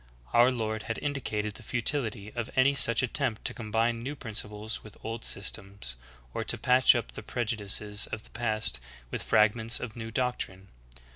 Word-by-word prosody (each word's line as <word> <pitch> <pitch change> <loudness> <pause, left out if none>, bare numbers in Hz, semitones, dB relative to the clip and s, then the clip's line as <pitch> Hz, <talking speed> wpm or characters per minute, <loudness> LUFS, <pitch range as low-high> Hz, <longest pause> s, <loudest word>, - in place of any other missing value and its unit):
Our 120 +2 +6
Lord 110 -3 -2
had 115 - -1
indicated 110 -7 -2
the - - -11
futility 115 -3 -1
of 120 -1 -3
any 130 +2 +5
such 115 -3 +4
attempt 125 -3 0
to 125 - +3
combine 115 0 0
new 140 +5 -4
principles 110 -2 -3
with 105 - -12
old 115 +1 -4
sys 100 -3 +1
tems, 100 - -4 0.4
or - - -2
to - - +3
patch 130 +1 +6
up 120 -2 -2
the - - -7
prejudices 105 -3 0
of 110 - -5
the - - -17
past 110 - 0 0.3
\\ith - - -2
frag 105 0 +4
ments 115 0 +1
of 115 -3 -6
new 115 -1 -5
doctrine. 110 -6 -2
115 Hz, 180 wpm, -29 LUFS, 105-120 Hz, 0.4 s, Our